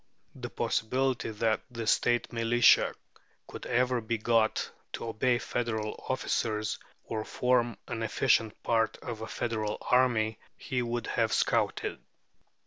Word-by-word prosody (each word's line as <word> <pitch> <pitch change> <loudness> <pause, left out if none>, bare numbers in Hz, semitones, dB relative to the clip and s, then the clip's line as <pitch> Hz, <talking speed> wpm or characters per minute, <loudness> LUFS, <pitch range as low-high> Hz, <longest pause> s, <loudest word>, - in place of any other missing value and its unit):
The - - -7
possibility 130 +3 0
that 110 0 0
the 115 -2 -5
State 120 +2 +2
militia 115 +1 +4 0.5
could - - -8
ever 125 0 +2
be 115 +1 -1
got 110 0 +1 0.2
to - - -4
obey 120 +3 +2
federal 110 -3 -3
officers, 110 -4 -1 0.2
or 110 -1 -3
form 120 0 +1
an 115 -2 -4
efficient 115 -1 +1
part 115 -1 +1
of 115 -3 -5
a 110 - -4
federal 110 -3 -2
army, 115 -4 +2 0.2
he 125 -1 -2
would 120 -1 -2
have - - 0
scouted. - - 0
115 Hz, 130 wpm, -29 LUFS, 110-120 Hz, 0.5 s, militia